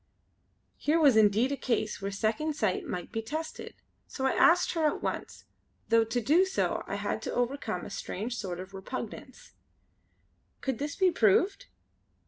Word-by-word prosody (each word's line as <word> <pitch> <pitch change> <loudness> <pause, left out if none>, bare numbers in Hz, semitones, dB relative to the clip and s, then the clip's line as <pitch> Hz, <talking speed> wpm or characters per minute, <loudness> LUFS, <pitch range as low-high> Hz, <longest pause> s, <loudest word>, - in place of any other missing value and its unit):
Here 310 +3 +2
was 285 -7 +6
indeed 220 +4 +4
a - - 0
case 220 -6 -1
where 195 - -2
Second 225 +10 -1
Sight 215 -9 -1
might 180 -1 -5
be 225 - -2
tested; 310 +8 -6 0.3
so 265 - -4
I 265 - +3
asked 350 +1 +4
her 320 -3 +2
at 295 - -2
once, - - -4 0.4
though 230 0 +5
to 230 +2 -1
do 300 - +4
so 380 0 -1
I - - -3
had - - -2
to - - -4
overcome 240 -7 -2
a - - -8
strange 220 +5 -4
sort 185 -6 -4
of 190 +1 -9
repugnance: 230 +5 -7 1.1
"Could 265 -4 -2
this 290 +1 -3
be 375 -2 +3
proved? 340 - +2
240 Hz, 165 wpm, -29 LUFS, 215-295 Hz, 1.1 s, was